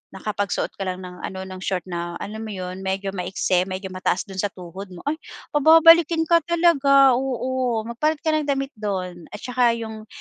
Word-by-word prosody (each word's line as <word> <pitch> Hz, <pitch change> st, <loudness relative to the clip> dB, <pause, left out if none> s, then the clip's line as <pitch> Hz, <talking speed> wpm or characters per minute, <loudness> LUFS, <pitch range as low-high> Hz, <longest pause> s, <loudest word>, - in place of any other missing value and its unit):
nakapagsuot 205 Hz, 0 st, -2 dB
ka 195 Hz, -, -3 dB
lang 185 Hz, 0 st, -4 dB
ng 180 Hz, 0 st, -9 dB
ano 190 Hz, 0 st, -6 dB
ng 185 Hz, 0 st, -8 dB
short 185 Hz, -1 st, -2 dB
na, 175 Hz, -1 st, -4 dB
alam 215 Hz, +1 st, -6 dB
mo 220 Hz, -, -6 dB
iyon? 185 Hz, -3 st, -6 dB
Medyo 190 Hz, +1 st, -2 dB
ma-iksi, 185 Hz, -1 st, 0 dB
medyo 190 Hz, 0 st, -5 dB
mataas 185 Hz, 0 st, -1 dB
dun 195 Hz, -2 st, -9 dB
sa 205 Hz, -, +1 dB
tuhod 185 Hz, +1 st, -9 dB
mo. 175 Hz, -, -11 dB
Ay! 305 Hz, +2 st, -2 dB, 0.3 s
pababalikin 325 Hz, +2 st, +6 dB
ka 335 Hz, +1 st, +4 dB
talaga, 280 Hz, -6 st, +5 dB
oo. 255 Hz, -2 st, -1 dB
"Magpalit 290 Hz, +7 st, -1 dB
ka 315 Hz, -, +2 dB
ng 310 Hz, -1 st, 0 dB
damit 275 Hz, -1 st, -1 dB
doon." 185 Hz, -4 st, -4 dB
At 210 Hz, -, -10 dB
saka 245 Hz, -2 st, +2 dB
iyong 220 Hz, -1 st, -7 dB
215 Hz, 190 wpm, -23 LUFS, 185-275 Hz, 0.3 s, pababalikin